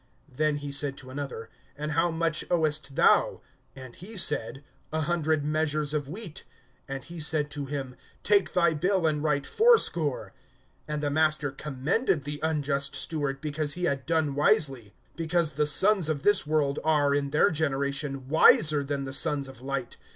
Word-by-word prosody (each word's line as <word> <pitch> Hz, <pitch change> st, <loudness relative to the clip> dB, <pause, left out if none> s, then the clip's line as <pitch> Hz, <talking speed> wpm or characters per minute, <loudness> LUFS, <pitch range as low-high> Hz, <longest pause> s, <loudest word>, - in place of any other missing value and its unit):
(7)Then 150 Hz, +1 st, +1 dB
he 145 Hz, -1 st, -6 dB
said 140 Hz, -1 st, -3 dB
to 130 Hz, 0 st, -11 dB
another: 135 Hz, -5 st, -6 dB, 0.3 s
And 150 Hz, +1 st, -4 dB
how 165 Hz, +3 st, +2 dB
much 165 Hz, -1 st, -1 dB
owest 155 Hz, -5 st, 0 dB
thou? -, -, +3 dB, 0.3 s
And 130 Hz, -3 st, -11 dB
he 210 Hz, +5 st, -7 dB
said: 145 Hz, -5 st, -1 dB, 0.3 s
A 160 Hz, +1 st, -1 dB
hundred 155 Hz, -2 st, 0 dB
measures 155 Hz, -1 st, -1 dB
of 145 Hz, -2 st, -2 dB
wheat. 185 Hz, -1 st, -7 dB, 0.4 s
And 135 Hz, -1 st, -5 dB
he 170 Hz, 0 st, -9 dB
said 150 Hz, -1 st, 0 dB
to 145 Hz, -1 st, -5 dB
him: 135 Hz, -3 st, -5 dB, 0.3 s
Take 205 Hz, -2 st, +2 dB
thy 170 Hz, -2 st, +3 dB
bill, 180 Hz, +3 st, 0 dB
and 150 Hz, -1 st, 0 dB
write 145 Hz, -2 st, 0 dB
fourscore. 175 Hz, -, +2 dB, 0.6 s
(8)And 150 Hz, -1 st, -2 dB
the 145 Hz, -1 st, -1 dB
master 155 Hz, -1 st, +1 dB
commended 150 Hz, -, -1 dB
the 145 Hz, +1 st, -5 dB
unjust 140 Hz, -3 st, -1 dB
steward, 140 Hz, -4 st, -3 dB
because 150 Hz, -1 st, -1 dB
he 180 Hz, -, -5 dB
had 140 Hz, -6 st, -1 dB
done 160 Hz, -3 st, +1 dB
wisely; 135 Hz, -6 st, +1 dB, 0.2 s
because 165 Hz, -1 st, 0 dB
the 150 Hz, +1 st, +1 dB
sons 190 Hz, +1 st, +3 dB
of 150 Hz, -2 st, -2 dB
this 205 Hz, -6 st, +3 dB
world 150 Hz, -2 st, +1 dB
are, 150 Hz, -3 st, +2 dB
in 140 Hz, -1 st, 0 dB
their 155 Hz, +7 st, +3 dB
generation, 140 Hz, -3 st, -2 dB
wiser 150 Hz, 0 st, +5 dB
than 140 Hz, 0 st, -3 dB
the 135 Hz, -, -6 dB
sons 140 Hz, 0 st, 0 dB
of 130 Hz, -2 st, -12 dB
light. 135 Hz, -2 st, -4 dB
150 Hz, 170 wpm, -27 LUFS, 140-160 Hz, 0.6 s, wiser